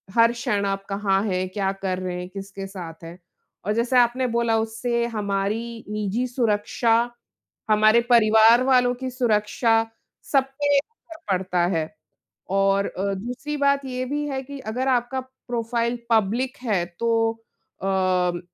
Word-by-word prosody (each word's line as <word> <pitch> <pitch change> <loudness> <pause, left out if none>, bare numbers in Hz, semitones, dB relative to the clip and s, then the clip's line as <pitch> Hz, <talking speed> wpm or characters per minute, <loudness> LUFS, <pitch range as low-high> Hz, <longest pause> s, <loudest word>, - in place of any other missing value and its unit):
हर 230 0 +6
क्षण 210 -4 -1
आप 195 0 -2
कहाँ 195 -1 +1
हैं, 185 -3 -1
क्या 195 -1 -1
कर 195 -1 -3
रहे 180 -1 -4
हैं, 180 - -6
किसके 195 0 -7
साथ 170 -4 -9
हैं। 165 +2 -9 0.5
और 210 - +1
जैसे 235 +3 +1
आपने 245 +2 +2
बोला, 235 -1 +1
उससे 235 +2 -1
हमारी 215 +2 -3
निजी 210 +3 -1
सुरक्षा 230 -1 +1 0.8
हमारे 215 +2 +5
परिवार 225 +1 +6
वालों 250 -1 +4
की 260 - -2
सुरक्षा 225 -1 +1 0.6
सब 275 -2 +4 0.2
पे 285 0 +3
असर 330 0 -6
पड़ता 180 -2 +1
है 160 - +1 0.7
और 195 0 +2
अ, 200 +1 -2
दूसरी 250 +9 -5
बात 280 -1 +2
ये 255 0 -3
भी 295 +3 -2
है 265 -1 -2
कि 280 +1 -9
अगर 250 +3 -3
आपका 250 +1 +1
प्रोफ़ाइल 240 -2 -3
पब्लिक 225 +4 +1
है, 200 -8 +1
तो 225 -1 +2 0.5
अम, 185 -2 +1
225 Hz, 145 wpm, -23 LUFS, 195-245 Hz, 0.8 s, हर